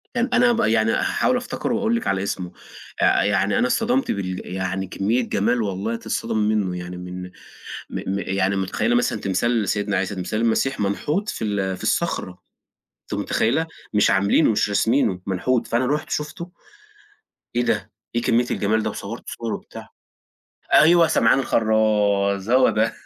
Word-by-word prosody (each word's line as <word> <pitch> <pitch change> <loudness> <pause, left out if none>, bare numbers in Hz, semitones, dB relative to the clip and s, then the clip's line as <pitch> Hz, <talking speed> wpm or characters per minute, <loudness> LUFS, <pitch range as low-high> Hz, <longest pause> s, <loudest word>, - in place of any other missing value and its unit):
كان 245 +1 +1
أنا 245 0 +5
بقى 230 - +1
يعني 110 0 +2
هاحاول 250 - +1
أفتكره 245 0 -3
وأقول 230 0 +1
لِك 235 - -3
على 95 0 0
إسمه، 90 -3 -4 0.5
آآ - - +4
يعني - - +1
أنا - - +2
اتصَدمت 245 - +1
بال 95 -2 -3
يعني 95 0 -2
كمية 105 +6 0
جَمال 120 +4 +1
والله 100 +2 -2
تتصدمي 110 -2 -1
مِنُه، 95 -4 -1
يعني 90 0 -7
من 90 0 -7
م 90 - -12 0.6
م 100 +1 -3
يعني 95 +1 0
مُتخيلة 95 +5 0
مثلًا 120 -3 +1
تمثال 110 +5 0
لسيدنا 105 0 -1
عيسى، 95 +2 -1
تمثال 95 +4 -3
المسيح 115 +3 +1
منحوت 150 - -1
في 115 - -3
ال 95 -3 -1
في - - -12
الصخرة، 90 -1 -2 0.6
أنتِ - - -8
متخيلة؟ 160 +9 0 0.3
مش 105 -1 +4
عاملينُه 100 +8 +3
مش 105 - +1
راسمينُه، 105 -2 +1
منحوت 115 +6 0
فأنا 120 +3 +1
رُحت 150 +4 -1
شُفته، 150 +4 -4 1.0
إيه 120 - +2
ده، - - -1 0.2
إيه 120 - +1
كمية 120 +1 +2
الجَمال 110 +2 +1
ده 110 - -1
و - - -6
صورت 110 +4 -7
صور 115 -2 -4
وبتاع، - - -9 0.9
أيوه 170 +2 +6
سمعان 115 -4 +3
الخرَّاز 105 -4 +1
هو 130 +1 +5
ده، 110 +1 +1
110 Hz, 165 wpm, -22 LUFS, 95-125 Hz, 1.0 s, أيوه